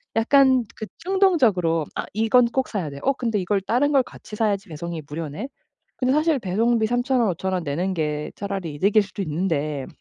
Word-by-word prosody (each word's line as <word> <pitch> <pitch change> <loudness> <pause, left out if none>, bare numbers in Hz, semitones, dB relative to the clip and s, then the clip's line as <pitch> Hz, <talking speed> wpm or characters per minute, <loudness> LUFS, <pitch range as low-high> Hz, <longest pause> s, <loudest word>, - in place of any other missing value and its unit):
약간 260 +2 +4
그 220 - -5
충동적으로 270 - +2
'아 - - -3
이건 225 +4 +4
꼭 260 +3 -1
사야 185 -8 -3
돼. 140 0 -9
어 275 - +3
근데 235 -5 -2
이걸 195 +2 0
다른 245 +9 +1
걸 275 -2 +5
같이 210 - -11
사야지 205 -3 0
배송이 165 +1 -5
무료네.' 160 - -5 0.5
근데 255 0 +1
사실 305 0 +2
배송비 220 +4 +1
3,000 245 +2 +1
원, 230 - +3
5,000 190 +2 -3
원 185 -1 -1
내는 170 +6 -2
게 150 -2 -2
차라리 195 -6 -4
이득일 200 +8 +3
수도 200 +1 -6
있는데 155 -4 -2
205 Hz, 340 characters per minute, -23 LUFS, 170-245 Hz, 0.5 s, 걸